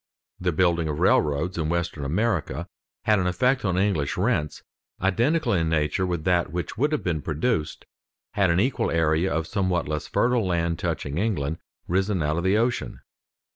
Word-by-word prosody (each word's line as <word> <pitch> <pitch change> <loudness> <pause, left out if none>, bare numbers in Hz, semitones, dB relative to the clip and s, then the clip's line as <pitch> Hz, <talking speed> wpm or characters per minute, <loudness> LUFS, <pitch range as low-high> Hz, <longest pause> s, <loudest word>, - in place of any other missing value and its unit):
The 90 -1 0
building 85 -1 +2
of 75 -1 -2
railroads 75 +5 +2
in 80 -1 -1
western 85 -3 -2
America 85 - -1 0.4
had 105 -2 +3
an 90 - 0
effect 125 +9 +1
on 90 -3 0
English 90 -8 0
rents 90 -7 0 0.4
identical 120 - +1
in 80 -3 +1
nature 80 +4 0
with 85 -3 -2
that 90 -3 +1
which 90 +1 -4
would 145 +7 +1
have 150 - -1
been 85 -4 -1
produced 80 +1 -2 0.5
had 100 -3 +2
an 85 +1 +3
equal 125 +6 +1
area 80 +2 +1
of 80 -1 -1
somewhat 95 -3 -1
less 75 0 -3
fertile 120 -4 +1
land 85 -2 0
touching 70 +3 -2
England, 85 -8 -1 0.3
risen 95 -1 0
out 75 +2 0
of 85 - -1
the 95 +3 +3
ocean. 120 +2 -1
90 Hz, 175 wpm, -25 LUFS, 80-100 Hz, 0.5 s, had